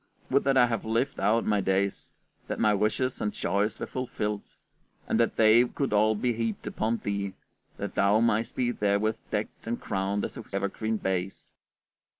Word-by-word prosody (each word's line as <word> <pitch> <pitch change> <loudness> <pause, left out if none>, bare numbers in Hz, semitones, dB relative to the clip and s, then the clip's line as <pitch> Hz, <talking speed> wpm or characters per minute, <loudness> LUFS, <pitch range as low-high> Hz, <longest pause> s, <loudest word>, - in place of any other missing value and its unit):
Would 140 +1 +3
that 135 -1 +3
I 125 - +7
had 115 -3 -2
lived 115 +5 -1
out 110 +4 +2
my 105 -1 +2
days, 95 +1 0 0.4
that - - -3
my 105 -1 +4
wishes 110 +5 0
and 105 - 0
joys 105 +2 -1
were - - -2
fulfilled, 105 -5 -4 0.5
and - - +1
that - - +2
they 110 +2 +6
could 130 0 -2
all 110 +1 +4
be 120 +3 0
heaped 115 -2 -3
upon 115 +2 -1
thee, 100 -1 -2 0.4
that - - -4
thou 100 +2 +3
mightst 115 0 +1
be 120 -1 +1
therewith 105 0 +1
decked 105 +1 -4
and 120 +1 -2
crowned 100 0 -1
as - - -7
with 115 - -10
evergreen 110 +3 -1
bays. 95 -1 -3
110 Hz, 175 wpm, -28 LUFS, 100-115 Hz, 0.5 s, I